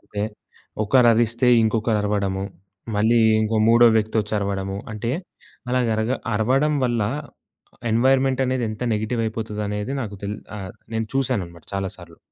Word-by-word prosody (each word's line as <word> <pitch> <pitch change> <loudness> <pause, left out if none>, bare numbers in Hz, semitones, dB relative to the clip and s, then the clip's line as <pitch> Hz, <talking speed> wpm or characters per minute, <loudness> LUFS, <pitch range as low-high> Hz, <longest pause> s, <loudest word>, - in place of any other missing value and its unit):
అంటే 100 - -5 0.6
ఒకరరిస్తే 120 +1 +4
ఇంకొకరు 110 0 +1
అరవడము. 100 -2 -1 0.5
మళ్ళీ 110 +3 +3 0.2
ఇంకో 110 +1 0
మూడో 115 +1 +7
వ్యక్తొచ్చరవడము. 105 -3 -1 0.2
అంటే, 110 +2 -3 0.6
అలాగా 125 -2 +1
అరగ 110 +2 -1 0.2
అరవడం 135 +8 +2
వల్ల 120 -3 +1 0.9
ఎన్‌వైర్‌మెంటనేది 130 +1 +2
ఎంత 110 +2 -6
నెగెటివయిపోతుందనేది 110 -1 -2
నాకు 105 -3 -6
తెలి 105 +1 -4 0.2
ఆహ్, 95 -2 -7 0.2
నేను 110 0 -1
చూసాననమాట 100 - -2
చాలా 95 -1 -2
సార్లు. 85 -2 -14
110 Hz, 110 wpm, -23 LUFS, 105-120 Hz, 0.9 s, మూడో